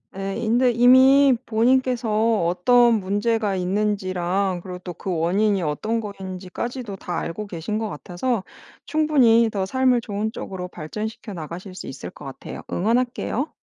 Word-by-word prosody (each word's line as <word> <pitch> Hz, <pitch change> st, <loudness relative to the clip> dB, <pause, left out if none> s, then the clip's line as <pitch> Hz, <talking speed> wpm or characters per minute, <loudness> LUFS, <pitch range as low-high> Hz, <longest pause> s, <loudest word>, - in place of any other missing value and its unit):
예. 195 Hz, +1 st, -4 dB
인데 240 Hz, +2 st, +2 dB
이미 260 Hz, +3 st, +6 dB
본인께서 230 Hz, -3 st, +2 dB
어떤 235 Hz, +7 st, +4 dB
문제가 205 Hz, +1 st, 0 dB
있는지랑 185 Hz, -1 st, -1 dB
그리고 180 Hz, -1 st, -7 dB
또 180 Hz, -1 st, -7 dB
그 190 Hz, -, -3 dB
원인이 195 Hz, +4 st, +2 dB
어떤 215 Hz, +9 st, -1 dB
거인지까지도 200 Hz, +3 st, -6 dB
다 180 Hz, -2 st, -5 dB
알고 205 Hz, +5 st, -5 dB
계신 195 Hz, +3 st, -4 dB
것 220 Hz, -1 st, -2 dB
같아서 185 Hz, +7 st, -3 dB, 0.4 s
충분히 255 Hz, -8 st, +4 dB
더 195 Hz, -2 st, -1 dB
삶을 255 Hz, +2 st, +2 dB
좋은 210 Hz, 0 st, -3 dB
쪽으로 185 Hz, -4 st, -6 dB
발전시켜 215 Hz, +7 st, -6 dB
나가실 180 Hz, +3 st, -7 dB
수 -, -, -8 dB
있을 135 Hz, -, -7 dB
것 -, -, -14 dB
같아요. 135 Hz, -, -8 dB
응원할게요. 240 Hz, -, -1 dB
210 Hz, 320 characters per minute, -23 LUFS, 185-235 Hz, 0.4 s, 이미